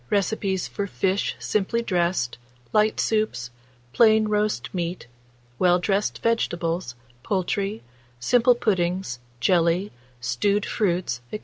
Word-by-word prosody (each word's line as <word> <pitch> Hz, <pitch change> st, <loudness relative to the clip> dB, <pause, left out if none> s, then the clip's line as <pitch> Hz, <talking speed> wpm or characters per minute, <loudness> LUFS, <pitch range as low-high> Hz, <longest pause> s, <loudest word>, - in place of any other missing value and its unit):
Recipes 195 Hz, -2 st, 0 dB
for 200 Hz, -, -4 dB
fish 190 Hz, -6 st, 0 dB
simply 210 Hz, -, 0 dB
dressed, 175 Hz, -, 0 dB, 0.3 s
light 215 Hz, 0 st, +3 dB
soups, 215 Hz, -, 0 dB, 0.4 s
plain 220 Hz, -2 st, +5 dB
roast 210 Hz, 0 st, -1 dB
meat, 175 Hz, 0 st, -3 dB, 0.5 s
well 180 Hz, -1 st, +5 dB
dressed 195 Hz, +3 st, -1 dB
vegetables, 170 Hz, -, 0 dB, 0.3 s
poultry, 195 Hz, -, -1 dB, 0.4 s
simple 245 Hz, -, +4 dB
puddings, 185 Hz, -, 0 dB, 0.2 s
jelly, 175 Hz, +5 st, +2 dB, 0.3 s
stewed 200 Hz, +11 st, 0 dB
fruits, 175 Hz, -, -1 dB
&c. 210 Hz, -, -5 dB
190 Hz, 105 wpm, -24 LUFS, 170-215 Hz, 0.5 s, plain